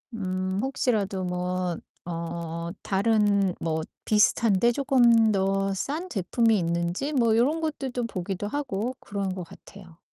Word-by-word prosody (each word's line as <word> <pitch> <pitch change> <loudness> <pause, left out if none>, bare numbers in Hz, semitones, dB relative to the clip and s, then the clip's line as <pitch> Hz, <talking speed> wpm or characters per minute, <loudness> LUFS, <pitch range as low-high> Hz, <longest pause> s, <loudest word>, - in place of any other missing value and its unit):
음 185 -1 -2
혹시라도 210 -8 0
뭐 180 0 -2 0.3
어 170 0 -4
다른 200 -2 +2
뭐 160 -1 -1 0.2
비슷한데 215 +1 +3
쪼금 235 -5 +4
더 195 0 +1
싼 310 - -3
제품이 225 +3 +2
있는지 170 - -1
뭐 230 -5 +3
요런 295 +7 +2
것들도 265 -6 -2
보기도 190 -1 -4
하고 250 -2 -2
그러는 200 -2 -3
것 185 - -5
같아요. 175 -1 -15
200 Hz, 250 characters per minute, -26 LUFS, 180-235 Hz, 0.3 s, 쪼금